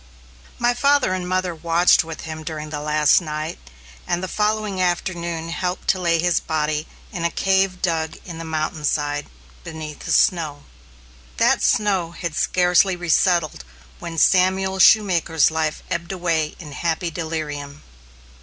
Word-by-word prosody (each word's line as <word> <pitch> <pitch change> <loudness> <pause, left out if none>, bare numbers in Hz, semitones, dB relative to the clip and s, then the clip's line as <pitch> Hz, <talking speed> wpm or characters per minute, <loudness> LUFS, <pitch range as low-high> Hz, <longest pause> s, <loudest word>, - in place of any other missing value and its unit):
My 240 0 +2
father 280 -5 +2
and 180 -1 -3
mother 185 -1 0
watched 170 +2 +3
with 160 0 -8
him 160 -1 -7
during 155 -1 -6
the 150 - -3
last 150 +2 +3
night, 155 0 -5 0.5
and 175 +1 -1
the - - -2
following 210 -1 -1
afternoon 170 -2 -2
helped 180 +2 -3
to 190 - +3
lay 170 -1 +2
his 175 +1 +2
body 155 0 -2 0.3
in 175 -4 -4
a 170 - +2
cave 190 0 +1
dug 160 -3 -1
in 170 -3 -8
the - - -5
mountain 155 -1 -3
side, 145 0 -1 0.4
beneath 155 -2 -8
the - - -3
snow. 155 -5 +2 0.7
That - - +3
snow 190 -5 +1
had 170 -2 -5
scarcely 180 +2 +3
resettled 175 - +1 0.4
when 165 -1 -7
Samuel 190 +2 +3
Shoemaker's 175 -6 +4
life 160 -1 -2
ebbed 170 +1 -3
away 165 -4 -1
in 150 -4 -10
happy 165 +3 -2
delirium. 150 -3 -5
170 Hz, 145 wpm, -21 LUFS, 155-185 Hz, 0.7 s, Shoemaker's